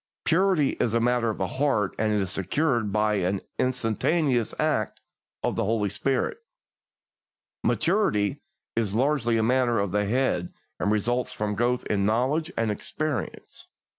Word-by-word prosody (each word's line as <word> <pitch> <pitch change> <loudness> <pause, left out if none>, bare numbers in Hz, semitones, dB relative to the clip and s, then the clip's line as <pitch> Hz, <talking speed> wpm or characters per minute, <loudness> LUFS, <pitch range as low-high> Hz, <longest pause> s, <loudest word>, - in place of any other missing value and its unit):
Purity 170 -4 +3
is 115 -1 +1
a - - +4
matter 120 0 +2
of 110 - -3
the 95 - 0
heart, 125 -3 0
and 110 0 +2
is 100 -3 0
secured 120 - 0
by 105 0 +2
an 95 +1 0 0.2
instantaneous 125 +1 +1
act - - 0 0.4
of - - 0
the - - 0
Holy 105 0 +1
Spirit; 135 - -1 1.2
maturity 145 - +1 0.3
is 105 -3 0
largely 125 -2 +2
a 110 - +2
matter 120 0 +2
of 100 -2 0
the 105 +1 +1
head 110 -6 0 0.3
and 105 - +1
results 120 +4 0
from 105 -1 -2
growth 120 +4 0
in 100 -2 0
knowledge 130 - +1
and 115 -2 +1
experience. 145 +2 -4
115 Hz, 145 wpm, -26 LUFS, 105-135 Hz, 1.2 s, a